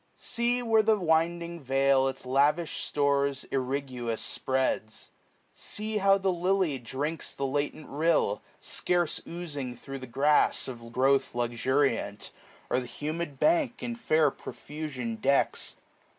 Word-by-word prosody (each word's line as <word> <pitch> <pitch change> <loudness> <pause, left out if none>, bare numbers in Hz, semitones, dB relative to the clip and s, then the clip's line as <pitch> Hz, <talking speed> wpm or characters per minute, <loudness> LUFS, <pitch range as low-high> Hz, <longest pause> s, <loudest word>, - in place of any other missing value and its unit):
490 - - -18
See, 240 +1 +2
where 225 -2 +4
the 215 0 +3
winding 170 0 0
vale 135 0 +3
its 135 - -5
lavish 145 +5 +2
stores, 140 -1 +1
Irriguous, 130 -3 -2
spreads. 130 -4 -1 0.4
See, 215 +1 -3
how 195 -1 +5
the 190 -1 +1
lily 180 -4 +1
drinks 140 +7 -3
The 140 - -2
latent 145 +2 -2
rill; 150 -8 +1 0.2
scarce 175 -2 -1
oozing 145 -7 -5
thro* 135 +3 -8
the 130 - -8
grass. 145 +5 +3
Of 115 -2 -8
growth 135 +2 +2
luxuriant; 120 -3 0 0.4
or - - +3
the 125 - -6
humid 150 +2 -4
bank. 305 -7 +2
In 240 - -3
fair 155 - +3
profusion, 140 -9 -6
decks. 140 +5 +1
145 Hz, 130 wpm, -28 LUFS, 130-170 Hz, 0.4 s, how